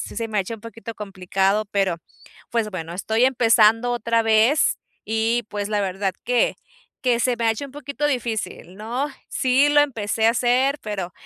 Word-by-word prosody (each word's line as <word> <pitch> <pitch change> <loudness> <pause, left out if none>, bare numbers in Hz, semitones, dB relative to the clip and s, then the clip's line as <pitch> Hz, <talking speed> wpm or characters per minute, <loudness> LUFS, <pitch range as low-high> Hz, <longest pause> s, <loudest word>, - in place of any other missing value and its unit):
sí - - -7
se 225 +1 -2
me 215 -1 -1
ha - - +4
hecho 195 +4 -5
un 215 - -14
poquito 230 0 -8
complicado, 195 +1 -1
pero 195 -4 0 0.5
pues, 230 -3 -1
bueno, 170 -3 -6
estoy 220 +6 +2
empezando 230 -2 +4
otra 230 -1 +1
vez, 225 +7 +3 0.3
y 225 +2 0
pues 205 -1 -3
la 210 -1 0
verdad 190 0 -2
que 245 0 +2 0.5
que 245 -2 +1
se 250 0 +1
me 235 - -2
ha 225 - +4
hecho 255 +6 -6
un 280 - -9
poquito 285 0 -3
difícil, 225 -8 -3
¿no? 235 +7 -2 0.2
Sí, 260 +3 +3
lo 290 0 +5
empecé 225 -6 0
a - - +6
hacer, 255 +4 +1
pero 195 -5 -4
225 Hz, 185 wpm, -22 LUFS, 205-245 Hz, 0.5 s, a